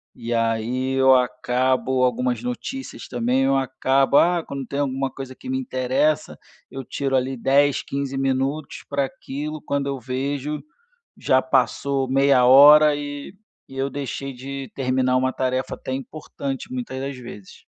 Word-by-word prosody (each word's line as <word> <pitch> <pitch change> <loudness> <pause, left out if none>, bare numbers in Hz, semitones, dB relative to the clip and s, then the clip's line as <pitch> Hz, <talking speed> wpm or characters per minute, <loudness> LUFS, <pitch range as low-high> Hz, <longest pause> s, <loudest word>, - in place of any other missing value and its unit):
e 120 0 -4
aí 115 +3 0
eu 135 0 +5
acabo, 125 +1 +1
algumas 125 -1 0
notícias 125 - -6
também, 125 +2 0
eu 135 +1 +2
acabo: 135 +1 +2
"Ah", 175 -1 +3
quando 140 -1 -5
tem 140 +4 -4
alguma 135 -1 -1
coisa 130 0 -8
que 260 - -10
me 265 - 0
interessa, 135 - 0 0.3
eu 135 - -7
tiro 135 +1 -2
ali 130 0 0
10, 140 +3 +3
15, 140 -1 -4
minutos 135 +2 -2
pra 140 -1 0
aquilo, 150 +3 -6
quando 140 -1 -2
eu 140 -1 -3
vejo, 140 +4 -3 0.6
já 130 0 +3
passou 135 +1 0
meia 135 -1 +4
hora 145 +4 +8
e 145 +3 -6 0.3
e 135 - -12
eu 135 +1 0
deixei 135 0 -5
de 135 0 -7
terminar 130 -1 +1
uma 130 0 +1
tarefa 130 0 -2
até - - -6
importante, 135 - -6
muitas 245 - -5
das 135 0 -4
vezes. 120 -6 -12
135 Hz, 150 wpm, -22 LUFS, 130-140 Hz, 0.6 s, hora